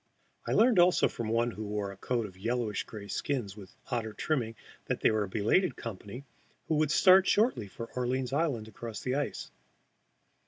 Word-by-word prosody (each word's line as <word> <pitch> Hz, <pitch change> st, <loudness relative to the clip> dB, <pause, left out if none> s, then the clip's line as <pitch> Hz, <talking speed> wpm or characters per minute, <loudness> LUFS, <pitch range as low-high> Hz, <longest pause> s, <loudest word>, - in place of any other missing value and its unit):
I -, -, 0 dB
learned 225 Hz, -3 st, +5 dB
also 175 Hz, +1 st, +5 dB
from 115 Hz, -2 st, -5 dB
one 115 Hz, +1 st, +1 dB
who 110 Hz, -, -6 dB
wore 105 Hz, -1 st, -3 dB
a -, -, -10 dB
coat 115 Hz, +3 st, -2 dB
of 95 Hz, -3 st, -10 dB
yellowish 115 Hz, +1 st, -2 dB
gray 105 Hz, -2 st, -9 dB
skins 115 Hz, -5 st, -2 dB
with 100 Hz, -3 st, -13 dB, 0.2 s
otter 110 Hz, -3 st, -2 dB
trimmings 120 Hz, -7 st, -1 dB, 0.3 s
that -, -, -2 dB
they -, -, +4 dB
were 110 Hz, 0 st, +1 dB
a -, -, -11 dB
belated 110 Hz, -, +2 dB
company, 115 Hz, +2 st, -7 dB, 0.4 s
who -, -, 0 dB
would 155 Hz, -1 st, +2 dB
start 185 Hz, +4 st, +6 dB
shortly 210 Hz, -, +2 dB
for 115 Hz, +4 st, -7 dB
Orleans 125 Hz, +1 st, -1 dB
Island 140 Hz, -8 st, 0 dB
across 110 Hz, 0 st, -7 dB
the 125 Hz, -, -2 dB
ice. 145 Hz, 0 st, -3 dB
115 Hz, 185 wpm, -30 LUFS, 105-140 Hz, 0.4 s, start